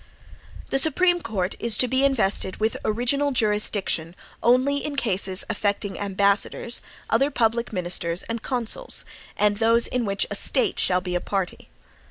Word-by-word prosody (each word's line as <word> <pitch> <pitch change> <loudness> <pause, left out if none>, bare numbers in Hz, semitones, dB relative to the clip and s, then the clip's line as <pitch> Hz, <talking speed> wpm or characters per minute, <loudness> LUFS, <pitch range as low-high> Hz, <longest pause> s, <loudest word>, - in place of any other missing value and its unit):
The 270 - +3
Supreme 350 +4 +3
Court 195 - -2
is 235 -2 +3
to 255 - +4
be 260 +2 0
invested 215 -8 +1
with 220 +1 0
original 250 +6 0
jurisdiction, 210 -7 0 0.3
only 255 +4 +3
"in 295 - -4
cases 195 -7 +1
affecting 205 -1 -2
ambassadors, 200 +3 0 0.3
other 270 +6 +3
public 235 -3 0
ministers, 175 -2 -1
and 230 0 -5
consuls, 255 - -1 0.3
and 205 0 +2
those 230 +1 +3
in 250 -2 -2
which 200 -1 -1
A - - -1
STATE 455 -6 +1
shall 180 0 +3
be 180 -1 -5
a 175 - -1
party." 195 -3 -4
225 Hz, 150 wpm, -23 LUFS, 195-255 Hz, 0.3 s, to